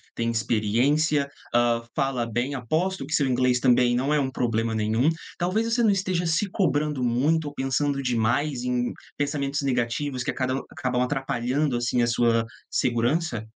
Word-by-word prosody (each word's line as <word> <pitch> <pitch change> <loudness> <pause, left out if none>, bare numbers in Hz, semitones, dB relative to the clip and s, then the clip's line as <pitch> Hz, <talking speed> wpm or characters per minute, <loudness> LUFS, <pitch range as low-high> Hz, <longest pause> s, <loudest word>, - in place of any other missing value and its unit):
tem 115 0 -1
experiência, 130 +7 +1 0.2
hã, 120 -1 +2
fala 130 -3 0
bem, 120 +5 -2
aposto 160 +7 -1
que 160 - -6
seu 140 -4 +2
inglês 125 0 +2
também 125 -1 +3
não 135 +4 0
é 150 - +3
um 130 -2 -1
problema 115 -2 -1
nenhum. 110 +6 +1 0.3
Talvez 215 +6 0
você 240 0 +2
não 215 - +5
esteja 185 -2 0
se 170 +5 +1
cobrando 150 -7 0
muito 145 +7 +1
ou - - -14
pensando 140 +1 -1
demais 125 +2 0
em 125 -1 0 0.3
pensamentos 145 -1 -1
negativos 125 +1 -1
que - - -1
a - - -9
cada 130 0 -1
o 135 - -4
acabam 125 -1 -1
atrapalhando, 130 +1 -1
assim, 120 +1 0
a 120 - +2
sua 115 -1 +2 0.2
segurança? 120 +1 0
130 Hz, 170 wpm, -25 LUFS, 120-150 Hz, 0.3 s, não